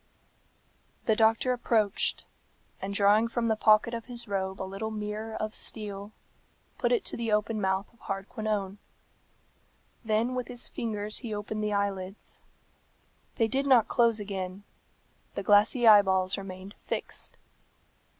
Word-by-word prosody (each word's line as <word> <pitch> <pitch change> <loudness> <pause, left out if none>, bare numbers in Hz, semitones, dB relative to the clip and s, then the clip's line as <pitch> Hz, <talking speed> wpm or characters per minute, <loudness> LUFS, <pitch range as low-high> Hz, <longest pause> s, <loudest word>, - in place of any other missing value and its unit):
The 220 - +3
doctor 225 +3 +3
approached, 220 -4 +1 0.6
and 195 - -3
drawing 205 +3 +4
from 230 0 -1
the 220 - +3
pocket 215 +2 +4
of 230 0 -5
his 240 -1 -5
robe 190 -1 -2
a - - -2
little 195 +3 -4
mirror 215 +1 -4
of 215 0 -3
steel, 205 -1 -6 0.7
put - - +1
it 470 -6 +2
to - - -2
the 230 -2 -2
open 210 +1 +1
mouth 190 +1 +1
of 235 - -27
Hardquanonne. 200 0 -3 1.2
Then 225 +3 +1
with 250 -1 -3
his 245 -1 -5
fingers 210 -2 -3
he 225 -4 -4
opened 210 +1 -4
the 210 0 0
eyelids. 200 -1 -3 0.9
They 225 - +2
did 270 +4 0
not 245 -5 +6
close 230 -2 +3
again; 195 -1 -5 0.7
the 200 - -3
glassy 210 +5 +4
eyeballs 190 -3 +6
remained 195 0 -8
fixed. - - -4
215 Hz, 140 wpm, -29 LUFS, 200-225 Hz, 1.2 s, not